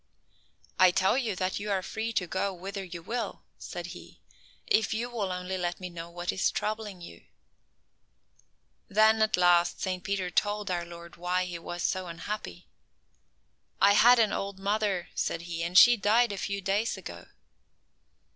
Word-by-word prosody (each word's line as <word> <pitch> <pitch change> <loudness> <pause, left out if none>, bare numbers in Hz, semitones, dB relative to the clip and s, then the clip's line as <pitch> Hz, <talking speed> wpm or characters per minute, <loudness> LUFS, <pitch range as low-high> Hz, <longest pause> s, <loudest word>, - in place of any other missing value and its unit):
"I 185 0 +8
tell 190 +4 +2
you 235 -7 -1
that 185 +1 -2
you 210 +1 -5
are 195 -2 0
free 220 +4 -3
to 185 - 0
go 190 +3 -1
whither 195 +2 -6
you 175 -2 -8
will," 235 +5 -4 0.2
said - - -6
He, - - -13 0.5
"if 220 0 +2
you 240 +2 -3
will 205 -6 -2
only 180 +1 -4
let 175 -1 -2
me 180 -1 -6
know 170 0 -8
what 175 +1 -3
is 190 - +1
troubling 210 -3 -4
you." 170 - -12 1.6
Then, 220 +1 +4
at 215 -2 +3
last, 175 -1 +4
Saint 185 -1 -3
Peter 190 -1 -2
told 205 +1 0
our 175 -1 -1
Lord 170 0 -11
why 180 +1 0
he 175 -2 -6
was 175 +1 -6
so 185 -1 -1
unhappy. 170 - -6 1.1
"I 200 +2 +6
had 245 +4 +7
an 220 -3 +3
old 200 -1 -3
mother," 200 -2 -1
said 165 - -2
he, 170 -1 -5
"and 175 +2 0
she 240 +2 +9
died 220 +3 +3
a 200 - -4
few 200 0 -3
days 200 +4 0
ago." - - -9
190 Hz, 170 wpm, -28 LUFS, 175-210 Hz, 1.6 s, she